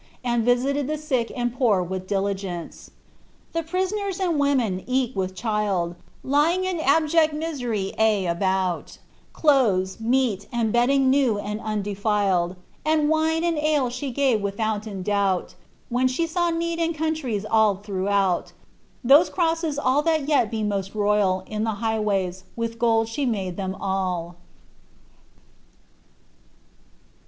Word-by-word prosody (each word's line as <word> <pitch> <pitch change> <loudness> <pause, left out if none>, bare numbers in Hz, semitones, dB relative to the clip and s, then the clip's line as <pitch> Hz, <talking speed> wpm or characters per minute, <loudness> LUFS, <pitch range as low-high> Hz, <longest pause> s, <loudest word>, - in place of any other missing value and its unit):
Ami 240 -1 +1
visited 260 +4 +1
ibe 310 - -1
sick 265 -6 -1
and 240 -1 -1
pour 225 -8 +2
with 185 +1 -5
diligeoce. 195 -3 -3 0.6
Thft 330 -1 -3
priaanBii 380 +2 -1
and 345 -5 0
women 255 -10 +1
cka 255 -1 0
with 190 -1 -2
child, 205 -6 -1 0.3
Lfing 305 +7 +2
in 370 -3 -2
abjpct 315 +2 +3
mi^pry 245 -11 -3
ay 215 -3 +3
about, 185 +1 -1 0.4
Cloibai, 220 - +2
meat, 230 -4 +1
and 230 -3 0
bedding 260 +2 +3
new 265 -6 +3
and 210 +1 -4
andoflled, 205 -4 0 0.3
And 305 -1 +2
wine 320 +1 +1
and 335 -3 0
ale 300 -4 +1
ibe 255 +1 -5
gave 265 -6 +2
wiihouien 205 -1 -3
doubt, 200 -2 0 0.4
When 250 +2 +2
the 260 +6 0
saw 345 +1 0
need 335 0 -2
in 330 0 0
countries 300 -10 -2
all 215 -3 +3
ihiouKboat, 195 -2 0 0.5
TboM 285 +7 +6
oroaseB 325 -4 0
all 260 +3 +3
that 315 -2 +1
fet 280 -7 +2
be 220 -1 -3
most 200 -1 -2
royal 205 -3 +2
In 215 +1 -3
the 220 -1 0
bighwajrs, 205 -5 -1
with 230 0 -4
gold 225 -1 +2
site 265 +4 -2
made 190 -5 -3
them 190 0 -3
all."' 185 -3 -2
230 Hz, 135 wpm, -24 LUFS, 200-290 Hz, 0.6 s, TboM